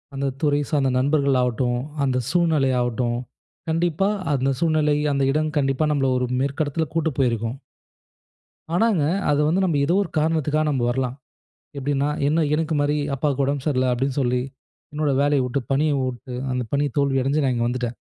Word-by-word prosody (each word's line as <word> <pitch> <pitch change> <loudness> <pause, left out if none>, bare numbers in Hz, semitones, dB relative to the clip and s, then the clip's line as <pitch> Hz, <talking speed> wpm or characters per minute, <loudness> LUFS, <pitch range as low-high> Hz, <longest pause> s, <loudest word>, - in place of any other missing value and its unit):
அந்த 135 0 -1
துறை 145 -2 +2
சார்ந்த 140 -3 +1
நண்பர்கள் 140 -1 +2
ஆவட்டும், 125 0 0 0.3
அந்த 130 -2 +1
சூழ்நிலை 160 -6 +2
ஆவட்டும், 120 0 -1 0.5
கண்டிப்பா 170 +4 +1 0.2
அந்த 135 0 +1
சூழ்நிலை, 155 -3 +2 0.2
அந்த 140 0 +1
இடம் 155 +1 0
கண்டிப்பா 135 +1 +1
நம்மள 135 -3 +1
ஒரு 125 - -1
மேற்கு 140 +3 0
இடத்தில 160 +3 -1
கூட்டு 165 -1 +1
போயிருக்கும். 115 -2 0 1.2
ஆனாங்க, 200 -6 +2 0.3
அது 145 - +2
வந்து 180 +5 +2
நம்ம 160 -5 +1
ஏதோ 170 - +1
ஒரு 170 - -8
காரணத்துக்கா 155 -1 +1
நம்ம 135 -4 0
வரலாம். 130 0 -1 0.6
எப்பிடின்னா, 140 +1 0 0.2
என்ன 155 +1 +2
எனக்குமாரி 150 -2 +1 0.2
அப்பாவுக்கு 140 0 0
உடம்பு 140 -1 -2
சரியில்ல. 130 -4 +1
அப்பிடின்னு 130 +3 -1
சொல்லி, 125 0 +1 0.5
என்னோட 150 -1 0
வேலைய 145 -1 +3
விட்டு 125 +2 -1
பணிய 150 +3 +2
விட்டு 130 0 -4 0.2
அந்த 125 0 -1
பணி 145 +1 +2
தோல்வி 140 -1 +2
அடஞ்சு 140 +3 +1
நான் 130 - +1
இங்க 120 0 0
வந்துட்டேன். 125 -1 -3
140 Hz, 165 wpm, -23 LUFS, 130-155 Hz, 1.2 s, வேலைய